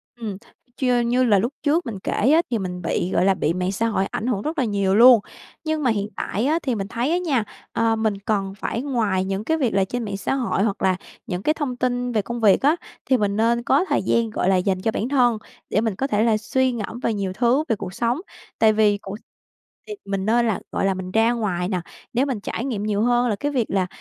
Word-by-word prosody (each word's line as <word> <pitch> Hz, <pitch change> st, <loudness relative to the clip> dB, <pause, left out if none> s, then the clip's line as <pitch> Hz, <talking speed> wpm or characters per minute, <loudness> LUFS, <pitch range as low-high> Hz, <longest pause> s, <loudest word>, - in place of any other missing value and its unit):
Ừm, 220 Hz, -5 st, -5 dB, 0.4 s
chư 250 Hz, -2 st, +2 dB
như 245 Hz, +2 st, +2 dB
là 210 Hz, -5 st, +4 dB
lúc 235 Hz, +8 st, -1 dB
trước 315 Hz, +3 st, +2 dB
mình 215 Hz, -6 st, -5 dB
kể -, -, -2 dB, 0.2 s
á, 325 Hz, -, +6 dB
thì 235 Hz, -, +1 dB
mình 180 Hz, -3 st, -4 dB
bị, 180 Hz, +1 st, -1 dB
gọi -, -, +2 dB
là, 195 Hz, -, +5 dB
bị 165 Hz, -3 st, 0 dB
mạng 180 Hz, +1 st, -1 dB
xã 225 Hz, +4 st, 0 dB
hội 200 Hz, -3 st, 0 dB
ảnh 215 Hz, +3 st, -4 dB
hưởng 225 Hz, -6 st, 0 dB
rất 310 Hz, +7 st, -4 dB
là 260 Hz, -, +2 dB
nhiều 200 Hz, -3 st, +1 dB
luôn. 240 Hz, +1 st, +8 dB, 0.4 s
Nhưng 315 Hz, -1 st, -1 dB
mà 250 Hz, -, +3 dB
hiện 205 Hz, -2 st, -1 dB
tại 215 Hz, +6 st, -2 dB
á, 315 Hz, +4 st, +2 dB
thì 255 Hz, -4 st, 0 dB
mình 195 Hz, -2 st, -3 dB
thấy 245 Hz, +7 st, -1 dB
á 345 Hz, -, +2 dB
nha, 300 Hz, -10 st, 0 dB, 0.3 s
ờ, 230 Hz, 0 st, +2 dB
mình 220 Hz, -1 st, 0 dB
cần 195 Hz, -1 st, -1 dB
phải 230 Hz, -, -2 dB
ngoài 220 Hz, -9 st, 0 dB
những 195 Hz, +1 st, -2 dB
cái 320 Hz, +7 st, 0 dB
việc 255 Hz, -9 st, 0 dB
là 195 Hz, -, +3 dB
trên 245 Hz, +5 st, -4 dB
mạng 200 Hz, -2 st, -4 dB
xã 200 Hz, -, -2 dB
hội 245 Hz, -7 st, 0 dB
hoặc 205 Hz, -3 st, -1 dB
là 185 Hz, -1 st, +3 dB, 0.3 s
những 180 Hz, -1 st, -3 dB
cái 305 Hz, -, +3 dB
thông 290 Hz, -5 st, -3 dB
tin 245 Hz, 0 st, -1 dB
về 220 Hz, -, +1 dB
công 235 Hz, +4 st, -5 dB
việc 205 Hz, -3 st, +5 dB
á, 295 Hz, +4 st, +4 dB, 0.3 s
thì 260 Hz, -, +3 dB
mình 205 Hz, -3 st, 0 dB
nên 235 Hz, +2 st, +2 dB
có 275 Hz, +8 st, +3 dB
thời -, -, +2 dB
gian, 230 Hz, +3 st, +1 dB
gọi 190 Hz, -3 st, 0 dB
là, 190 Hz, -, +4 dB
dành 185 Hz, 0 st, 0 dB
cho 220 Hz, -, 0 dB
bản 225 Hz, +2 st, -2 dB
thân 245 Hz, -5 st, +3 dB, 0.3 s
để 210 Hz, -, +1 dB
mình 220 Hz, -4 st, -1 dB
có 270 Hz, -, -1 dB
thể 215 Hz, -4 st, +1 dB
là 220 Hz, -2 st, +3 dB
suy 260 Hz, +4 st, 0 dB
ngẫm 235 Hz, 0 st, -5 dB
về 230 Hz, -, 0 dB
nhiều 195 Hz, -3 st, -2 dB
thứ, 250 Hz, +7 st, +2 dB
về 225 Hz, -, +3 dB
cuộc 185 Hz, -2 st, -7 dB
sống. 235 Hz, +7 st, 0 dB, 0.4 s
Tại 220 Hz, -1 st, +5 dB
vì 210 Hz, -1 st, +3 dB
cuộc 200 Hz, 0 st, -8 dB, 0.7 s
thì 425 Hz, -, -5 dB
mình 195 Hz, -1 st, -2 dB
nên 235 Hz, +2 st, +3 dB
là, 220 Hz, -, 0 dB
gọi -, -, -1 dB
là, 195 Hz, -, +2 dB
mình 185 Hz, 0 st, -6 dB
ra 225 Hz, +2 st, +3 dB
ngoài 185 Hz, -6 st, -2 dB
nè, 185 Hz, -3 st, -1 dB, 0.3 s
để 250 Hz, +3 st, +2 dB
mình 260 Hz, -6 st, -2 dB
trải 225 Hz, +4 st, -4 dB
nghiệm 225 Hz, -7 st, -3 dB
nhiều 210 Hz, -1 st, 0 dB
hơn 245 Hz, +1 st, +2 dB
là 215 Hz, -, 0 dB
cái 290 Hz, +8 st, -2 dB
việc 250 Hz, -6 st, 0 dB
là 190 Hz, -2 st, +1 dB
225 Hz, 260 wpm, -22 LUFS, 195-245 Hz, 0.7 s, luôn